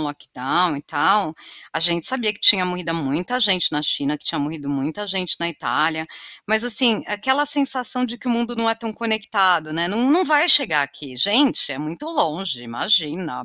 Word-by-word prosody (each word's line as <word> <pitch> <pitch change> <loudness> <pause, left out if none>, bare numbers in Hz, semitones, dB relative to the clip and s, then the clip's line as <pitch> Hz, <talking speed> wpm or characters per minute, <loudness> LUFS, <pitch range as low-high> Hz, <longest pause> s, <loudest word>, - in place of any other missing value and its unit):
lockdown 145 +3 -2
e 145 - -9
tal, 195 +2 0 0.4
a - - -2
gente 170 0 +4
sabia 240 -5 -1
que - - -17
tinha 185 -3 +6
morrido 180 -2 -5
muita 165 - -3
gente 195 -6 +2
na 150 -1 -2
China, 145 0 -2
que - - -21
tinha - - -2
morrido 145 -1 -6
muita 150 +9 -5
gente 190 -2 -2
na 170 - -2
Itália, 160 0 -2 0.4
mas 220 +2 +1
assim, 240 -1 +4
aquela 265 +8 -1
sensação 265 -3 +3
de 240 0 -7
que - - -14
o - - -1
mundo 235 0 -3
não 230 0 -1
é 225 - +1
tão 225 -1 -8
conectado, 200 -8 0
né. 170 +2 -2
Não 235 +8 -1
não 360 +4 +3
vai 305 +1 +2
chegar 165 - +5
aqui, 140 -2 -9
gente, 215 - +2
é 135 - -6
muito 155 - -8
longe, 170 - -3
imagina, 155 - -2
185 Hz, 190 wpm, -19 LUFS, 155-235 Hz, 0.4 s, tinha